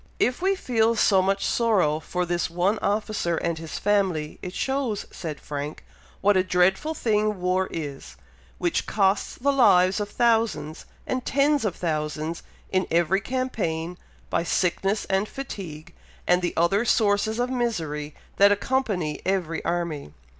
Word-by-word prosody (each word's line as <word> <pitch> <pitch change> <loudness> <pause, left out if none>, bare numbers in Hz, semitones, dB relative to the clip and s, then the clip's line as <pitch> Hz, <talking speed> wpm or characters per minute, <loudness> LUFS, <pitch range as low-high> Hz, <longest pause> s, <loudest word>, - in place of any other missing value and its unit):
"If 250 +4 +1
we 390 +1 +2
feel 230 -8 +1
so 195 -3 +4
much 195 +1 0
sorrow 195 -10 +2
for 180 +3 -2
this 175 0 -1
one 180 +5 +1
officer 205 -5 -1
and 165 -1 -2
his 160 -1 -6
family, 190 -7 0
it 180 0 -7
shows," 265 -6 -1
said 155 -4 -6
Frank, 145 +1 -6 0.4
"what 205 +1 +4
a 185 - +4
dreadful 190 - +2
thing 215 -5 +1
war 185 +1 +1
is, 140 - -6 0.4
which 175 -2 -1
costs 195 -1 +1
the 280 +3 +1
lives 185 -7 +5
of 205 -1 -3
thousands 225 - 0 0.2
and 255 -1 -2
tens 285 0 +2
of 195 - -1
thousands 155 0 -2 0.3
in 185 -1 +1
every 170 +4 +2
campaign, 195 -10 -2 0.4
by - - +1
sickness 195 +4 0
and 195 +2 0
fatigue, 170 - -7 0.3
and 180 0 +3
the 175 - -2
other 170 +6 +3
sources 220 -1 +2
of 245 +1 0
misery 160 - -2 0.2
that 200 +1 +7
accompany 205 - -1
every 180 -4 -1
army." 170 - -3
190 Hz, 145 wpm, -25 LUFS, 165-220 Hz, 0.4 s, that